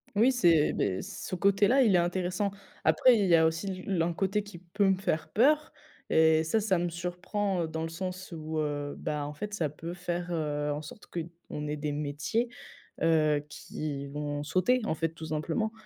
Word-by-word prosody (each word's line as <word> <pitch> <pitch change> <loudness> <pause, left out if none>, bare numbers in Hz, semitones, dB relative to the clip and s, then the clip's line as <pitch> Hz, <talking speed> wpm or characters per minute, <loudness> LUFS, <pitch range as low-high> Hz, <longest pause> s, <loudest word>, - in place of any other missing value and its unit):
Oui, 235 +6 +5
c'est, 170 - +4
beh, 95 -1 0
ce 190 -1 -5
côté-là, 200 +8 +4
il 210 -6 +4
est - - +6
intéressant. 185 +3 0 0.3
Après, 225 +10 +5
il 200 - +2
y 170 - +6
a 160 - +5
aussi 185 +3 -2
l'un 175 -3 +1
côté 195 +4 0
qui 205 -4 -11
peut 190 +3 0
me 190 - +3
faire 175 -4 -1
peur 300 +7 +3 0.4
et 160 0 +5
ça, 190 +8 +1
ça 195 -4 +1
me 175 - 0
surprend, 180 +3 -2
heu, 160 - -2
dans 160 0 -4
le 165 - -3
sens 185 +2 -5
où, 155 0 -4
heu, 145 -1 -2
bah, 150 -1 -3
en 150 - -6
fait, 210 +7 -6
ça 165 -7 0
peut 165 +4 -7
faire, 175 0 -3
heu, 150 -2 -1
en 150 - -4
sorte 155 +7 -11
qu'on 165 -3 -6
ait 150 - -2
des 150 0 -2
métiers, 150 +11 -1 0.5
heu, 155 -3 +3
qui 145 -2 -5
vont 145 +1 -3
sauter, 210 +11 +2
en - - 0
fait, 165 0 0
tout 160 -1 -8
simplement 160 +8 -1
170 Hz, 195 wpm, -29 LUFS, 155-195 Hz, 0.5 s, est